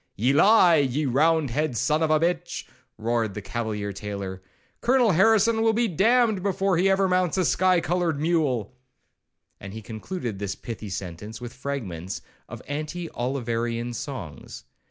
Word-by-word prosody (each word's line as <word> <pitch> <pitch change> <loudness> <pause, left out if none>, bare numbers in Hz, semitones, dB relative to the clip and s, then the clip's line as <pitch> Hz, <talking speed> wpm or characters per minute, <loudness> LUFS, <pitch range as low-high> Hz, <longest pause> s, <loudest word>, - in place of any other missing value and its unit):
'1 110 - -4
'Ye 135 - +4
lie, 185 +1 +6
ye 140 +1 +1
round 150 +2 +2
head 145 -1 -1
son 155 +5 +1
of 160 - +2
a 155 0 +4
b— 165 - +2
h,' 175 +1 -3 0.3
roared 110 -2 -1
the - - -3
cavalier 105 -2 -3
tailor, 100 -1 -6 0.4
'Colonel 245 -3 +4
Harrison 220 +5 +4
will 225 0 +3
be 235 +1 +2
damned 220 +3 +3
before 195 0 +1
he 190 +3 +3
ever 195 0 +3
mounts 180 -1 +1
a 185 - +2
sky 185 +1 +3
coloured 170 -3 0
mule;' 145 - 0 0.8
and 95 0 -9
he 110 - -7
concluded 115 - -5
this 100 -1 -3
pithy 110 -3 -7
sentence 95 +3 -6
with 120 -1 -8
fragments 100 -10 -5 0.3
of - - -9
anti 155 +4 -4
Oliverian 120 -2 -2
songs. 115 - -7
145 Hz, 160 wpm, -25 LUFS, 110-180 Hz, 0.8 s, lie